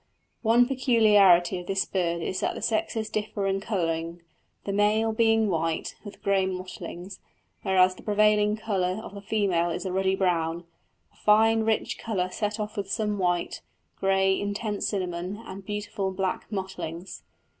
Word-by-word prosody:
One 235 Hz, +2 st, +4 dB
peculiarity 210 Hz, -9 st, +4 dB
of 175 Hz, -, -10 dB
this 195 Hz, -1 st, +1 dB
bird 170 Hz, -3 st, -1 dB
is 185 Hz, -, -2 dB
that -, -, -1 dB
the -, -, -6 dB
sexes 220 Hz, 0 st, -1 dB
differ 215 Hz, -1 st, -3 dB
in 195 Hz, 0 st, 0 dB
colouring, 170 Hz, -4 st, -2 dB, 0.4 s
the 200 Hz, -, -3 dB
male 215 Hz, +2 st, +2 dB
being 225 Hz, -1 st, +3 dB
white, 165 Hz, -3 st, -1 dB
with 205 Hz, -2 st, -11 dB
grey 195 Hz, -1 st, +2 dB
mottlings, 185 Hz, 0 st, -7 dB, 0.4 s
whereas 185 Hz, -2 st, +4 dB
the -, -, -14 dB
prevailing 210 Hz, 0 st, +3 dB
colour 195 Hz, -3 st, -1 dB
of -, -, -9 dB
the 200 Hz, -, -8 dB
female 195 Hz, -5 st, +1 dB
is 170 Hz, +3 st, -4 dB
a 185 Hz, -, -2 dB
ruddy 190 Hz, +1 st, +1 dB
brown, 170 Hz, -3 st, 0 dB, 0.5 s
a -, -, -27 dB
fine 225 Hz, +1 st, +4 dB
rich 220 Hz, -1 st, 0 dB
colour 185 Hz, -5 st, -2 dB
set 210 Hz, +2 st, -2 dB
off 210 Hz, 0 st, -4 dB
with 200 Hz, -1 st, -3 dB
some 210 Hz, -2 st, -1 dB
white, 175 Hz, -1 st, 0 dB, 0.4 s
grey, 195 Hz, 0 st, +2 dB
intense 205 Hz, +1 st, -2 dB
cinnamon, 180 Hz, -1 st, -3 dB
and 190 Hz, 0 st, -9 dB
beautiful 205 Hz, -2 st, -3 dB
black 190 Hz, +2 st, -3 dB
mottlings. 190 Hz, -3 st, -5 dB
195 Hz, 155 wpm, -26 LUFS, 185-210 Hz, 0.5 s, One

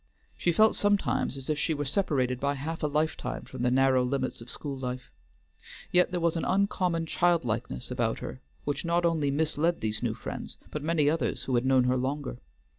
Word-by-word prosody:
She 175 Hz, -, +1 dB
felt 215 Hz, +6 st, +5 dB
sometimes 205 Hz, -8 st, +1 dB
as 135 Hz, -, -7 dB
if 150 Hz, -1 st, 0 dB
she 160 Hz, -, +1 dB
were 145 Hz, 0 st, -2 dB
separated 135 Hz, -6 st, 0 dB
by 140 Hz, +1 st, 0 dB
half 160 Hz, +4 st, -4 dB
a 150 Hz, -, +1 dB
lifetime 150 Hz, -3 st, -1 dB
from -, -, -8 dB
the 125 Hz, -, +3 dB
narrow 130 Hz, 0 st, +4 dB
limits 130 Hz, -1 st, -1 dB
of 115 Hz, -, -10 dB
school 145 Hz, -2 st, -4 dB
life. 125 Hz, -1 st, -5 dB, 0.8 s
Yet 180 Hz, 0 st, +4 dB
there 180 Hz, -1 st, -2 dB
was 170 Hz, -1 st, +1 dB
an 165 Hz, -, -1 dB
uncommon 185 Hz, -3 st, +1 dB
childlikeness 160 Hz, -, 0 dB
about -, -, 0 dB
her 65 Hz, -, -7 dB, 0.2 s
which 145 Hz, -, -2 dB
not 170 Hz, 0 st, +1 dB
only 160 Hz, -4 st, +2 dB
misled 160 Hz, +3 st, +1 dB
these 110 Hz, 0 st, -2 dB
new -, -, -1 dB
friends, -, -, -6 dB
but 150 Hz, -, -3 dB
many 155 Hz, -1 st, +2 dB
others 160 Hz, +2 st, 0 dB
who 130 Hz, -, -3 dB
had 120 Hz, +1 st, +2 dB
known 130 Hz, -1 st, +5 dB
her 125 Hz, +1 st, +2 dB
longer. 130 Hz, -1 st, -3 dB
145 Hz, 195 wpm, -28 LUFS, 130-165 Hz, 0.8 s, felt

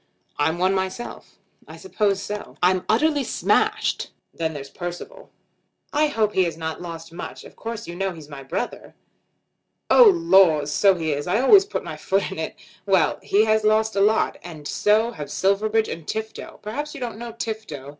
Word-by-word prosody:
"I'm 160 Hz, +3 st, +1 dB
one 185 Hz, +2 st, +2 dB
myself." 190 Hz, +5 st, -5 dB, 0.3 s
"I -, -, -11 dB
suppose 205 Hz, -, -1 dB
so." 210 Hz, 0 st, -6 dB
"I'm 185 Hz, 0 st, +3 dB
utterly 290 Hz, +6 st, +2 dB
smashed. -, -, 0 dB, 0.2 s
Then 160 Hz, -1 st, -2 dB
there's 140 Hz, -1 st, -8 dB
Percival." 180 Hz, -, -7 dB, 0.6 s
"I 305 Hz, +1 st, +3 dB
hope 220 Hz, -7 st, 0 dB
he 185 Hz, -, +3 dB
has 165 Hz, -2 st, -4 dB
not 160 Hz, 0 st, -5 dB
lost 165 Hz, -1 st, -8 dB
much. 175 Hz, -, -8 dB
Of -, -, -14 dB
course 230 Hz, 0 st, -6 dB
you 170 Hz, -, -6 dB
know 195 Hz, +1 st, -1 dB
he's 160 Hz, -4 st, -11 dB
my 140 Hz, -2 st, -9 dB
brother." 135 Hz, -, -5 dB, 1.0 s
"Oh -, -, +8 dB
laws; 190 Hz, -, +4 dB
so 195 Hz, -2 st, +4 dB
he 160 Hz, -3 st, -2 dB
is. 145 Hz, +3 st, -4 dB
I 195 Hz, +5 st, +2 dB
always 385 Hz, -, +6 dB
put -, -, -4 dB
my -, -, -7 dB
foot 195 Hz, 0 st, -1 dB
in 190 Hz, -, -6 dB
it. 160 Hz, -, -4 dB, 0.3 s
Well; 185 Hz, -6 st, +2 dB
he 210 Hz, +2 st, +3 dB
has 215 Hz, 0 st, +2 dB
lost 215 Hz, 0 st, +2 dB
a 195 Hz, -, +2 dB
lot. 215 Hz, +2 st, +2 dB
And 155 Hz, -4 st, -9 dB
so 220 Hz, +3 st, +2 dB
have 150 Hz, -10 st, -7 dB
Silverbridge 215 Hz, +3 st, +1 dB
and 165 Hz, -2 st, -7 dB
Tifto. 220 Hz, 0 st, -6 dB
Perhaps 290 Hz, +9 st, -5 dB
you -, -, -7 dB
don't 235 Hz, -4 st, -5 dB
know 235 Hz, -1 st, -7 dB
Tifto." 220 Hz, -, -6 dB
195 Hz, 185 wpm, -23 LUFS, 165-225 Hz, 1.0 s, Oh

